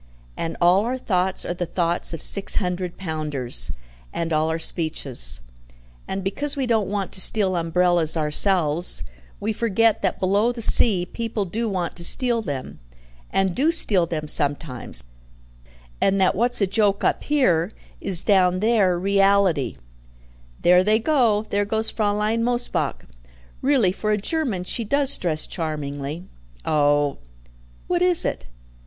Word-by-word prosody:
And 165 - -5
all 180 +3 +3
our 255 +1 -2
thoughts 190 -6 -1
are - - -3
the 175 0 -5
thoughts 170 0 -2
of 165 - -6
six 200 - +4
hundred 180 -2 -3
pounders, 150 - 0 0.4
and 165 -1 -4
all 155 +1 0
our 160 - -2
speeches; 140 - +2 0.7
and 190 0 -4
because 285 +10 -3
we 270 - -1
don't 220 -5 0
want 200 -2 -3
to 185 - +1
steal 195 -3 +7
umbrellas 170 -1 +1
ourselves, 160 +1 +1 0.4
we 220 +2 -3
forget 225 0 +1
that 190 - -2
below 200 +5 +1
the 245 - -9
sea 195 -5 +2
people 225 0 -4
do 220 +5 -3
want 180 -4 -4
to 170 - -5
steal 240 +4 +1
them, 140 -10 -7 0.5
and 190 -2 0
do 285 - +1
steal 205 - +2
them 155 -2 -5
sometimes, 140 - -1 1.0
and 195 0 +1
that 190 - +3
what's 240 +2 0
a - - +4
joke 200 0 0
up - - 0
here 195 - +1 0.3
is 185 -3 +2
down 185 -3 +2
there 205 -4 +1
reality 195 - +1 0.4
" - - -27
"There 180 +1 +5
they 215 +2 +2
go 230 -5 +1
there 205 0 +1
goes 220 +2 0
Fraulein 210 +1 -1
Mosebach. 240 0 -2 0.6
Really, 260 -9 +2
for 210 +3 -5
a 210 - +1
German 225 - -3
she 230 +5 -4
does 275 +5 +4
dress 155 -4 0
charmingly. 150 -1 -5 0.4
Oh 145 -1 +1 0.3
!" - - -27
"What 355 -1 -1
is 360 -2 +5
it?" - - -4
185 Hz, 150 wpm, -22 LUFS, 165-220 Hz, 1.0 s, steal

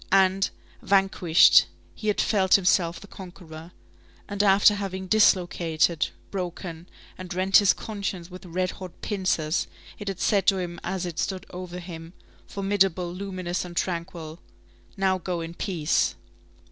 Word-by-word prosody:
and, 195 0 +3 0.3
vanquished, 195 -4 +5 0.3
he 215 - -7
had 210 - +1
felt 190 -3 +3
himself 180 -3 +2
the - - -12
conqueror. 175 -4 -11 0.6
And, 200 0 -1
after 200 +1 +6
having 190 -2 -4
dislocated, 175 -5 +2 0.2
broken, 175 -2 -6 0.3
and 185 0 -8
rent 190 +1 +4
his 205 -3 +5
conscience 200 -5 -5
with 185 +1 -10
red 185 +1 -2
hot 185 -2 -10
pincers, 185 -6 -1 0.3
it 205 - -8
had 195 -2 -3
said 200 -3 +1
to 195 - +5
him, 175 -2 -4
as 190 -2 -3
it 170 -2 -5
stood 190 -2 -2
over 180 0 -7
him, 170 -1 -9 0.3
formidable, 195 -3 0
luminous, 185 -2 -4
and 175 -1 -9
tranquil: 170 -2 -4 0.6
"Now, 190 -1 +1
go 180 0 -3
in 165 0 -6
peace!" 170 -4 0
185 Hz, 140 wpm, -25 LUFS, 175-195 Hz, 0.6 s, after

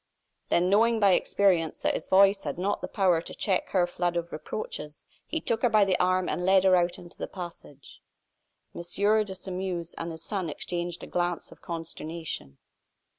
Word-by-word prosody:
Then, 175 +1 +3
knowing 225 +4 +4
by 200 -2 +5
experience 180 -3 +2
that - - 0
his - - -4
voice 195 +1 +5
had 145 0 -4
not 195 +3 -1
the - - -3
power 180 -4 +2
to - - -9
check 190 -3 0
her 180 -2 +3
flood 175 0 -1
of 170 0 -3
reproaches, 150 -2 -6 0.2
he 320 - -2
took 230 -6 -1
her 245 - +4
by 215 -2 +5
the 190 -2 +2
arm 185 0 +2
and 180 - -2
led 190 +1 +5
her 190 -1 +6
out 175 -1 +1
into 175 0 -13
the - - -3
passage. 170 -6 -10 0.7
M. - - -6
de 205 +3 +1
Sairmeuse 180 -2 -4
and 165 - -3
his 160 0 -9
son 185 -4 -3
exchanged 175 +2 -4
a - - -5
glance 175 -1 -2
of - - -15
consternation. 160 - -6
180 Hz, 185 wpm, -28 LUFS, 170-195 Hz, 0.7 s, her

